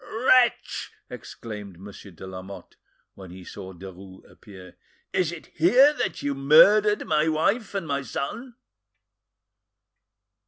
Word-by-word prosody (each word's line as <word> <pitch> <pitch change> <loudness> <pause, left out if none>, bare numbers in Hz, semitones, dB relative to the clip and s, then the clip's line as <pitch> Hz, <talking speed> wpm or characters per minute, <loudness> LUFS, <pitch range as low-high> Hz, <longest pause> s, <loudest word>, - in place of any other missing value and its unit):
"Wretch!" 245 +2 +1 0.2
exclaimed 105 -5 -10
Monsieur 100 +1 -12
de 90 0 -12
Lamotte, 95 +1 -10 0.4
when 95 -2 -12
he 90 +1 -12
saw 95 +1 -10
Derues 95 +1 -13
appear, 95 -3 -15 0.4
"is 175 -3 0
it 170 -2 -10
here 250 - +5
that - - -4
you 145 - -1
murdered 195 +10 +4
my 155 0 +1
wife 200 +8 -1
and 195 -4 -3
my 140 -1 -2
son?" 230 - -6
140 Hz, 120 wpm, -24 LUFS, -, 0.4 s, here